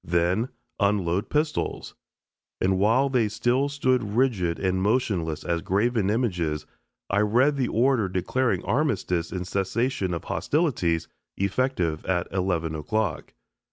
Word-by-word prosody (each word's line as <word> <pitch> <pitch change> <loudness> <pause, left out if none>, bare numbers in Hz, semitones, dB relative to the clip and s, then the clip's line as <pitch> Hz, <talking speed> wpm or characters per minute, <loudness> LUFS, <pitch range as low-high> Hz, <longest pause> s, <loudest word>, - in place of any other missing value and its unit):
Then 90 +8 +1 0.3
"Unload 100 -2 +1
pistols." 150 +1 -1 0.7
And 95 0 +1
while 115 +7 +3
they 125 -5 +1
still 120 +6 +1
stood 130 -3 +1
rigid 105 -6 0
and 95 -1 0
motionless 95 -8 0
as 85 -1 -1
graven 105 +2 +1
images, 90 - -1 0.5
I 100 - +3
read 120 +8 +3
the 130 -3 0
order 120 -3 +2
declaring 95 +3 0
armistice 100 - 0
and 90 0 -4
cessation 100 0 -1
of 85 - -6
hostilities 120 - 0 0.3
effective 100 - 0
at 90 -2 0
11 90 -4 -1
o'clock. 90 +5 -2
100 Hz, 120 wpm, -25 LUFS, 90-125 Hz, 0.7 s, while